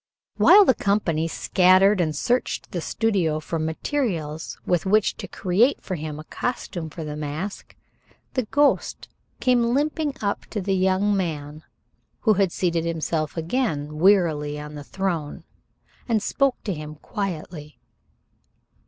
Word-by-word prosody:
While 410 -1 +8
the 260 - +5
company 180 -8 0
scattered 185 +3 +4
and 155 -3 -1
searched 245 - -1
the 175 - -3
studio 185 -7 0
for 160 +2 -4
materials 160 - -2
with 175 +1 0
which 215 +1 +3
to - - -7
create 210 +9 +2
for 190 - -6
him 155 -3 -5
a - - -7
costume 175 -5 -4
for 160 +1 -7
the 150 -1 -5
mask, 150 +7 -5 0.6
the 255 -3 0
ghost 285 +6 +1 0.3
came 250 -1 +3
limping 295 0 0
up 200 -1 -2
to 215 - -4
the 195 0 -1
young 190 +2 +2
man 155 -5 -3 0.6
who 220 - +4
had 195 -3 +2
seated 170 -2 0
himself 165 -1 -2
again 160 - -2
wearily 160 -6 +3
on 150 0 -8
the 145 -1 -7
throne, 170 -3 -3 0.7
and 220 -3 +2
spoke 275 -2 +1
to 200 - -2
him 155 -1 -7
quietly. 160 -4 -6
180 Hz, 140 wpm, -24 LUFS, 155-210 Hz, 0.7 s, While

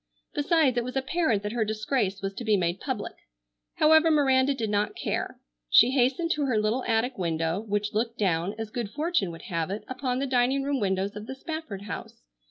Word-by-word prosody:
Besides, 290 -4 +2
it 240 - +2
was 255 +2 -6
apparent 265 - 0
that 210 - -3
her 235 -1 0
disgrace 215 -2 -1
was 195 0 -2
to 240 - -6
be 215 -2 +3
made 175 0 -1
public. 255 -7 -4 0.6
However, 315 +1 +5
Miranda 275 -3 +3
did 225 -5 -2
not 205 0 0
care. - - -3 0.3
She 240 - +7
hastened 265 +6 +2
to 295 -2 +1
her 245 -4 +1
little 215 +4 +1
attic 230 +1 0
window, 165 0 0
which 205 -1 -2
looked 230 +2 -1
down, 185 0 0
as 220 -1 -5
good 235 -3 -3
fortune 300 - 0
would 165 0 -9
have 165 -3 -2
it, 200 +3 -4
upon 255 -1 -2
the 275 - -1
dining 260 +1 +2
room 280 -1 0
windows 195 0 -1
of 210 +1 -7
the 265 - -5
Spafford 315 - -6
house. 205 - -8
230 Hz, 200 wpm, -27 LUFS, 205-270 Hz, 0.6 s, She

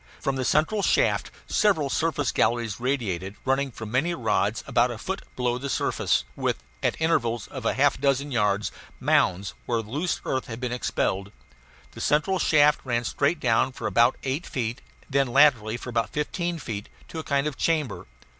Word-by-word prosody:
From 135 -2 -1
the 130 - -1
central 155 - +2
shaft - - +2 0.2
several 185 -9 +2
surface 145 -3 0
galleries 115 -2 0
radiated, 105 -8 -2
running 135 +1 +1
for 115 -2 -8
many 135 +11 0
rods 110 -3 0
about 120 +1 +3
a 120 - -5
foot 190 - -4
below 125 -1 0
the 140 +2 -4
surface, - - +1
with, - - -2 0.2
at - - 0
intervals 120 -9 +1
of 130 -5 -7
half 140 +4 +2
a - - -15
dozen 140 0 +1
yards, 105 -4 +1 0.3
mounds 95 +2 +2
where 115 -2 0
the 105 - -13
loose 155 +5 -1
earth 130 -1 -1
had 115 0 -6
been 125 -1 -3
expelled. 100 -5 -1 0.6
The - - -9
central 180 +6 +2
shaft 150 -1 +4
ran 120 -2 0
straight 140 +6 0
down 125 +1 +2
for - - -7
about 120 +2 +3
eight 135 +6 -2
feet, 120 -1 -3 0.2
and - - -22
then 140 0 +3
laterally 120 -4 +4
for 125 - -7
about 115 -1 0
fifteen 170 +3 -2
feet, 105 -8 -6 0.2
to 165 - -5
a - - -4
kind 140 -1 0
of 150 -3 -2
chamber. 145 - -1
130 Hz, 185 wpm, -26 LUFS, 115-145 Hz, 0.6 s, shaft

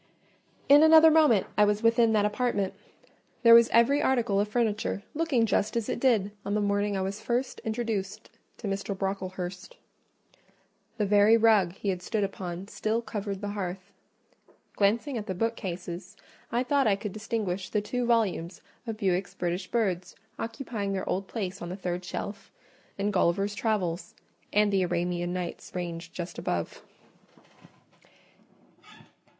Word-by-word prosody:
In 285 +1 +8
another 320 0 +8
moment 300 -10 +4
I - - +7
was 210 +1 +1
within 230 0 +4
that 210 -1 +3
apartment. 210 -2 0 0.7
There 230 -1 +8
was 235 0 +8
every 245 +5 +4
article 235 -6 +2
of 205 - +1
furniture 215 -2 -1
looking 290 -7 +1
just 210 +1 0
as 230 - -2
it - - -2
did 225 -6 +2
on 205 - -2
the - - +2
morning 205 0 0
I - - -1
was 195 +2 -4
first 245 +2 -2
introduced 220 -2 -3 0.3
to 220 - -6
Mr. 195 0 -3
Brocklehurst: 185 -1 -4 1.2
the 210 - +1
very 205 +2 +5
rug 215 -6 +4
he 200 +1 -4
had 180 -2 -2
stood 210 +3 -1
upon 190 -1 -5
still 220 +2 -2
covered 200 -3 -4
the 205 - -3
hearth. 190 -1 -5 0.8
Glancing 230 +6 +1
at 210 - -8
the 190 - -3
bookcases, 180 -4 -4 0.3
I 240 +2 +1
thought 275 0 +2
I 200 - +4
could 200 +1 -5
distinguish 210 -4 -3
the 210 - +1
two 245 +4 -2
volumes 190 -7 0 0.3
of 225 -1 -4
Bewick's 185 -2 -1
British 180 +1 -2
Birds 190 -6 -1 0.2
occupying 225 -4 -4
their 190 - -3
old 190 +1 -2
place 195 -3 -4
on 175 - -5
the 180 - -4
third 180 -2 -3
shelf, 200 +3 -6 0.5
and 205 +1 -1
Gulliver's 195 +3 +1
Travels 180 -6 -2 0.4
and 210 0 +3
the 195 - +3
Arabian 175 0 -1
Nights 180 -1 -5
ranged 170 -2 -5
just 175 0 -6
above. 85 -1 -3
205 Hz, 150 wpm, -28 LUFS, 185-225 Hz, 1.2 s, In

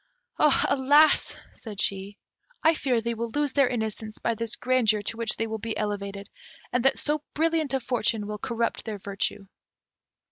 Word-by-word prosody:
"Alas!" 285 +3 +4 0.2
said 210 -4 -9
she, 195 +1 -2 0.5
"I 320 - +6
fear 255 -6 0
they 235 +1 -2
will 230 +1 -3
lose 290 -2 0
their 275 -2 +4
innocence 220 -2 -4
by 230 - 0
this 230 +1 -3
grandeur 235 -5 +2
to 215 - -3
which 230 -1 +1
they 225 - 0
will 220 0 -4
be 225 +1 -4
elevated, 200 -1 -3 0.5
and 250 -1 +1
that 270 0 +4
so 300 0 -1
brilliant 320 -3 +1
a - - +1
fortune 230 -4 0
will 210 0 -5
corrupt 230 +1 -2
their 220 -2 -5
virtue." 200 0 -3
230 Hz, 170 wpm, -26 LUFS, 210-265 Hz, 0.5 s, I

